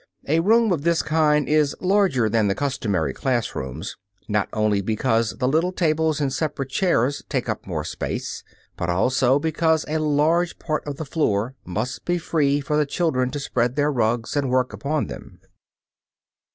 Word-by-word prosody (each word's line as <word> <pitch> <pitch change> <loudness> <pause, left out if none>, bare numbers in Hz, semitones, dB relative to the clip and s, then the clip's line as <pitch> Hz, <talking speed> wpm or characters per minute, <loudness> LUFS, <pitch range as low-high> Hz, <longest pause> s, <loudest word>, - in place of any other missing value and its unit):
A 160 +4 +3
room 225 +4 +4
of 165 -5 0
this 170 +1 +1
kind 150 -2 +2
is 150 -2 +2
larger 185 - +2
than 110 -1 +2
the 100 - +1
customary 105 - -1
class 120 - -1
rooms, 65 -1 -6 0.3
not 105 -2 0
only 105 -2 +1
because 115 +2 0
the 125 - 0
little 160 +6 +2
tables 160 -3 +1
and 140 -3 0
separate 135 -3 -3
chairs 145 -6 +1
take 130 -4 -1
up 110 -4 -4
more 80 -5 -3
space, 80 - -4 0.3
but 85 - -3
also 125 +8 +3
because 160 +1 +1
a 155 +1 -1
large 155 +3 +1
part 155 -2 -2
of 145 - -3
the 160 - -5
floor 125 -6 0
must 110 +8 -4
be 175 0 0
free 145 -4 +1
for 150 +1 -1
the 150 -1 +2
children 135 -6 0
to 145 - -4
spread 125 -2 -1
their 145 +1 +2
rugs 115 0 0
and 140 -2 0
work 125 -2 +1
upon 140 +8 -1
them. - - -10
140 Hz, 175 wpm, -23 LUFS, 115-155 Hz, 0.3 s, room